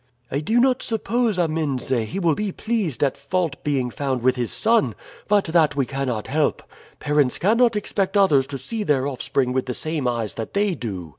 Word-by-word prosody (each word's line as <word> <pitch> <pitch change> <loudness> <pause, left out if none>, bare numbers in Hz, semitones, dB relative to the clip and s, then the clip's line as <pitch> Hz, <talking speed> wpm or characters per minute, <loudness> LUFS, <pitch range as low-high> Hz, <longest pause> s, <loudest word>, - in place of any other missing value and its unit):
"I 140 - 0
do 220 +11 +1
not 255 0 +3
suppose, 225 -1 0
Amense, 155 -7 -1 0.2
he 105 - -5
will 170 -4 +2
be 205 +5 -2
pleased 195 - -2
at 140 - +1
fault 165 +1 -2
being 135 -4 0
found 130 -2 -2
with 130 0 +3
his 120 -2 -2
son, 225 0 +2 0.3
but 205 -1 +3
that 160 -3 +2
we 140 -2 +1
cannot 130 -4 -3
help. 150 +1 0 0.4
Parents 150 -3 +1
cannot 230 +4 +3
expect 200 -1 -1
others 145 -10 +4
to 140 - -5
see 215 - -5
their 140 -7 +1
offspring 130 -1 -1
with 130 0 -1
the 125 - -2
same 155 -4 -2
eyes 115 -3 -1
that 115 - -6
they 200 -1 +2
do. 95 - -5
150 Hz, 195 wpm, -22 LUFS, 130-200 Hz, 0.4 s, others